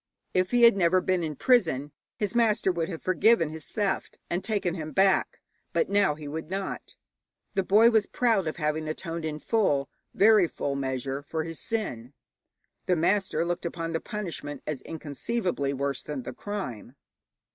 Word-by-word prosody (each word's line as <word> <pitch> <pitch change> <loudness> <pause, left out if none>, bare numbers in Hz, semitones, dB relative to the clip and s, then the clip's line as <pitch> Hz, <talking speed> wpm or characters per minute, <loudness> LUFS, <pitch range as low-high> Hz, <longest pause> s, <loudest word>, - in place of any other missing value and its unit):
If 185 0 +2
he 245 -1 +3
had 235 -3 +8
never 185 -1 +3
been 185 -1 0
in 155 -3 -3
prison, 160 - +2 0.2
his 210 +1 -2
master 225 -5 +3
would 170 -1 -2
have 165 -3 -6
forgiven 185 -2 +3
his 160 0 -8
theft 205 -3 -2
and 175 +2 -1
taken 200 -5 -1
him 155 -3 -6
back, 195 0 +3 0.3
but 480 - +1
now 200 -7 +3
he 150 -1 -9
would 155 +2 -5
not. 195 +1 -5 0.6
The 195 - +2
boy 215 +5 +5
was 220 -3 +3
proud 225 -8 +1
of 155 - -2
having 155 0 -1
atoned 165 +1 -4
in 155 -1 -3
full, 150 -8 +1 0.2
very 210 -3 +6
full, 140 -3 -3
measure 135 0 -3
for 160 +2 -3
his 165 -2 -5
sin; 130 - -3 0.7
the 180 - +3
master 175 -1 +1
looked 175 +1 -2
upon 165 -1 -3
the 160 - -1
punishment 165 -9 -5
as 150 -4 -4
inconceivably 160 - -2
worse 140 0 -2
than 145 -4 -5
the - - -6
crime. 140 - -6
170 Hz, 170 wpm, -27 LUFS, 150-200 Hz, 0.7 s, had